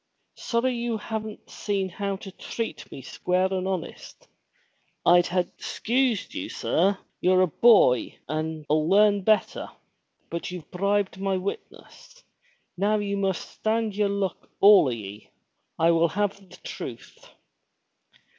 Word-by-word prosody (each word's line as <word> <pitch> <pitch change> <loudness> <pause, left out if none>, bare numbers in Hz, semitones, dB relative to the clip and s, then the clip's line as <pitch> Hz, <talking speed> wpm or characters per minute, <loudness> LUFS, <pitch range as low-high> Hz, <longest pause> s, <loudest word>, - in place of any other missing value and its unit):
Sorry 250 +2 -1
you 235 -1 -2
haven't 220 0 -6
seen 200 -2 -2
how 200 +2 -3
to 195 0 -9
treat 230 +4 -6
me 135 - -9
square 185 +7 0
and 185 0 -1
honest! 185 -3 -6 0.8
I'd 175 0 +6
ha' 180 0 +1 0.2
'sensed 245 -3 0
you, - - -5
sir. 195 +3 +1 0.2
You're 185 +1 +4
a - - +3
boy 200 - +5
and 155 +1 -3
'11 155 +1 +1
learn 205 +1 +5
better. 215 +2 +1 0.6
But 170 - -4
you've 180 -4 -9
bribed 200 +1 0
my 195 -1 0
witness. - - -8 0.5
Now 205 +3 +1
you 200 -1 -2
must 195 -2 -1
stand 220 -1 -1
yer 205 -1 +1
luck, 200 -1 -3
all 200 -3 +8
o' - - +1
ye. 105 -3 -7 0.5
I 165 +1 +4
will 165 0 +4
have 205 +3 -1
the - - -14
truth!" - - -9
195 Hz, 135 wpm, -26 LUFS, 175-210 Hz, 0.8 s, all